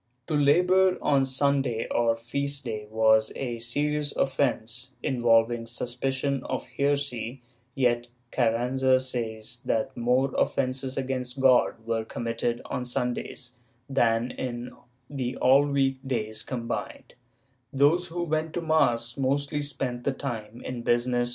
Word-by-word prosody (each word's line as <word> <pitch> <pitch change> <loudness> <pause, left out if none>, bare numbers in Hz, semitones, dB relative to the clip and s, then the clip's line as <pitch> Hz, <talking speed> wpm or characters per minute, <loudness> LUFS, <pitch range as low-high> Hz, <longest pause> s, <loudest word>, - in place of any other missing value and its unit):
^ - - -47
To 155 - -4
labor 180 +6 +4
on 135 -2 +3
Sunday 135 -3 +1
or 115 -1 +2
feast 140 +4 -3
day 105 -2 -4
was 110 0 +4
a 120 -3 -3
serious 145 +5 -1
offence, 130 -2 -1
involving 115 -2 +2
suspicion 130 +3 -2
of 130 - -3
heresy, 140 -3 -1 0.3
yet 120 -2 +1 0.2
Carranza 130 +2 +2
says 115 -2 -5
that 135 -1 -1
more 125 +3 +1
offences 130 0 0
against 130 -1 -3
God 125 -3 +3
were 115 -1 -1
committed 115 +1 -3
on 125 - -3
Sundays 125 0 -3 0.4
than 120 -3 +2
in 125 -1 -5
all 130 +2 0
the - - -3
week 135 -1 +2
days 110 -4 -2
combined; 115 0 -5 0.6
those 150 +6 +3
who 175 +1 -3
went 160 -1 -1
to 175 - -1
mass 120 -7 +2
mostly 140 +2 0
spent 130 -4 -3
the 140 - 0
time 120 -4 -6
in 120 -2 -5
MSS. 120 +1 +1
130 Hz, 130 wpm, -27 LUFS, 120-140 Hz, 0.6 s, labor